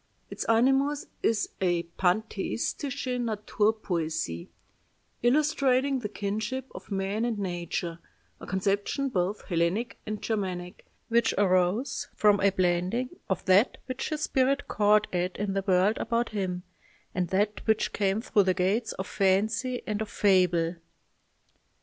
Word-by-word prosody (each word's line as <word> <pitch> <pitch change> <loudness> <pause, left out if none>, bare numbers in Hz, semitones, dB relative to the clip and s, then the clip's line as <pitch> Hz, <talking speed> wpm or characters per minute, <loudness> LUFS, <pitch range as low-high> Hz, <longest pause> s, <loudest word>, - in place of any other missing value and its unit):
Its - - -4
animus 270 +5 +3 0.2
is 220 -2 +1
a 175 -2 +2 0.2
pantheistische 240 +7 -1
Naturpoesie, 205 - -1 0.7
illustrating 270 0 +2
the 210 -4 -4
kinship 215 +6 -3
of - - -10
man 195 +2 -1
and 235 -2 -1
nature, 175 -3 -3 0.4
a - - -10
conception 200 +8 0
both 190 -1 -1
Hellenic 175 +7 -1
and 215 0 -3
Germanic, 185 -5 -4 0.2
which 235 0 +2
arose 185 +5 +1
from 210 -1 +4
a 200 - +4
blending 185 +6 0 0.2
of 190 - -1
that 195 +6 +4
which 255 0 -4
his 310 -1 -3
spirit 275 0 +1
caught 210 0 +3
at 180 0 -1
in 200 -1 -2
the 195 0 -1
world 190 +3 +3
about 235 0 0
him 185 -4 -3 0.5
and 180 -1 0
that 205 +4 0
which 220 -1 +2
came 200 +1 +1
through 215 -3 +3
the 185 -1 +2
gates 205 +6 0
of 190 - -5
fancy 215 +7 +1
and 210 -1 -2
of 215 - -3
fable...." 180 -4 +2
205 Hz, 130 wpm, -28 LUFS, 185-235 Hz, 0.7 s, from